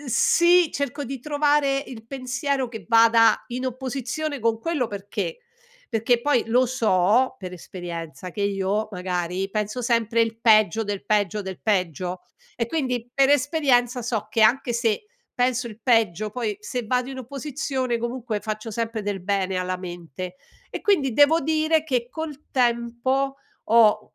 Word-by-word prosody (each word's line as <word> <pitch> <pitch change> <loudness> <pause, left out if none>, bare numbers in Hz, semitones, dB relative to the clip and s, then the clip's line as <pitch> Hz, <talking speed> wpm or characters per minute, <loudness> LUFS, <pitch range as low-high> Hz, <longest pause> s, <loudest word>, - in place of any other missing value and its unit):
uhm, 290 - -11
sì, 345 +8 +4
cerco 280 0 -3
di 270 +1 -5
trovare 290 -1 +2
il 225 -3 -10
pensiero 265 0 -2
che 225 -2 -9
vada 230 -1 +5
in 255 +1 -3
opposizione 265 +3 -3
con 225 0 +1
quello, 310 -5 -1
perché: 205 - -4 0.5
perché 230 +1 +1
poi, 285 -2 +2
lo 250 +3 +4
so, 230 +1 +2
per 185 -2 -7
esperienza 175 -2 -7
che 205 - -3
io, 200 +2 0
magari, 180 0 -2
penso 215 +4 -2
sempre 230 -1 +1
il 225 0 -3
peggio, 215 -2 +4
del 205 -1 -4
peggio, 210 -1 +1
del 190 -1 -7
peggio, 180 -3 -1 0.3
e 230 - -1
quindi, 250 -4 -2
per 270 -1 +4
esperienza, 260 -4 +2
so 225 -3 -2
che 225 - 0
anche 245 +3 +3
se, 235 - 0 0.3
penso 245 0 0
il 220 0 -12
peggio, 215 -4 +2
poi 215 -2 -3
se 240 +3 -4
vado 250 +2 0
in 265 - -7
opposizione, 260 -1 -3
comunque, 235 -2 -3
faccio 215 +1 -5
sempre 230 0 -2
del 200 -1 -3
bene 190 -1 0
alla 185 0 -2
mente. 175 0 -7 0.3
E - - -5
quindi, 325 - +2
devo 290 +6 +5
dire 315 +1 +1
che 250 -6 -1
col 310 -1 -7
tempo 245 +2 0 0.3
ho, 215 -1 +4
235 Hz, 155 wpm, -24 LUFS, 210-265 Hz, 0.5 s, vada